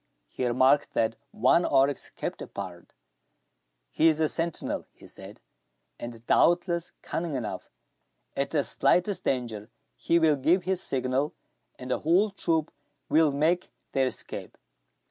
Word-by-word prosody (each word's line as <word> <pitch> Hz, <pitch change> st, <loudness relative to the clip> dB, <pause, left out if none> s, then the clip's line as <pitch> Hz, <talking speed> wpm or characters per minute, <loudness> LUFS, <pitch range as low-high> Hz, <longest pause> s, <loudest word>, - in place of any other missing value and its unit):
He 125 Hz, -, -3 dB
remarked 130 Hz, +4 st, +3 dB
that 110 Hz, 0 st, +1 dB
one 130 Hz, +9 st, +3 dB
oryx 135 Hz, -1 st, +2 dB
kept -, -, -5 dB
apart. 90 Hz, -3 st, -8 dB, 1.0 s
"He 160 Hz, -, +3 dB
is 160 Hz, -1 st, +3 dB
a 160 Hz, -, +3 dB
sentinel," 165 Hz, +1 st, -3 dB
he -, -, -17 dB
said, -, -, -10 dB, 0.6 s
"and 120 Hz, -1 st, -8 dB
doubtless 175 Hz, +2 st, +2 dB
cunning 165 Hz, -3 st, -3 dB
enough. 120 Hz, -5 st, -5 dB, 0.7 s
At 140 Hz, 0 st, -1 dB
the 150 Hz, -3 st, +1 dB
slightest 180 Hz, +7 st, +1 dB
danger, 115 Hz, -4 st, -2 dB, 0.3 s
he 170 Hz, -, +1 dB
will 160 Hz, -3 st, +4 dB
give 165 Hz, +7 st, +2 dB
his 185 Hz, 0 st, -1 dB
signal, 130 Hz, +2 st, -1 dB, 0.4 s
and 125 Hz, 0 st, -7 dB
the -, -, +1 dB
whole 185 Hz, +7 st, +3 dB
troop 165 Hz, -5 st, -1 dB, 0.4 s
will 155 Hz, -1 st, +4 dB
make 160 Hz, +6 st, +1 dB, 0.2 s
their 135 Hz, -1 st, +2 dB
escape. -, -, -5 dB
145 Hz, 135 wpm, -27 LUFS, 130-170 Hz, 1.0 s, will